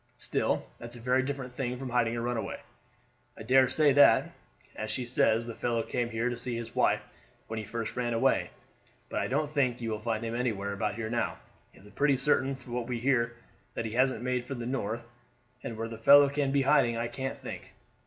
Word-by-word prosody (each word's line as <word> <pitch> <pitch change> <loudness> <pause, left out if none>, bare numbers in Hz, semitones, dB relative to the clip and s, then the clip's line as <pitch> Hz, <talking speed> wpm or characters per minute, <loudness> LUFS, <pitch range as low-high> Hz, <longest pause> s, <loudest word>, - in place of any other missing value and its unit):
Still, - - -1
that's 120 0 -7
a - - -9
very 125 +2 +2
different 130 -2 -4
thing 125 -1 -3
from 130 -1 -6
hiding 120 -1 +2
a - - -2
runaway. 120 -1 -3 0.8
I 110 - -8
dare 130 +2 +5
say 145 +1 +4
that, 145 +1 +6 0.4
as 110 - -4
she 125 - -2
says, 115 -1 +2
the 115 - -6
fellow 115 0 -1
came 120 -1 -2
here 115 +1 -1
to 125 - -1
see 120 0 -4
his 115 -1 -6
wife - - +2 0.4
when 110 0 -4
he 110 - -6
first 115 +1 -4
ran 120 -1 -1
away; 115 - +2 0.6
but - - -2
I - - -1
don't 145 +3 -1
think 130 -5 +1
you 115 -2 -3
will 110 - -2
find 115 0 -2
him 115 - -3
anywhere 110 -5 -1
about 105 +1 -2
here 110 -1 -4
now. 120 -1 -1 0.3
It's 100 - -17
pretty 140 +6 +2
certain 135 -1 +2
from 125 -2 -11
what 120 -1 -2
we 125 -1 -2
hear 120 -2 +1 0.4
that - - -2
he 110 - -4
hasn't 125 0 +1
made 125 -1 -1
for 135 - -5
the 120 -1 -5
North, 120 -2 -3 0.5
and 115 -3 -6
where 115 +1 -3
the 115 -1 -8
fellow 140 +4 +8
can 140 -1 0
be 140 0 +2
hiding 135 -4 +3
I 115 0 -1
can't 135 +2 -4
think. - - -8
120 Hz, 220 wpm, -29 LUFS, 115-130 Hz, 0.8 s, fellow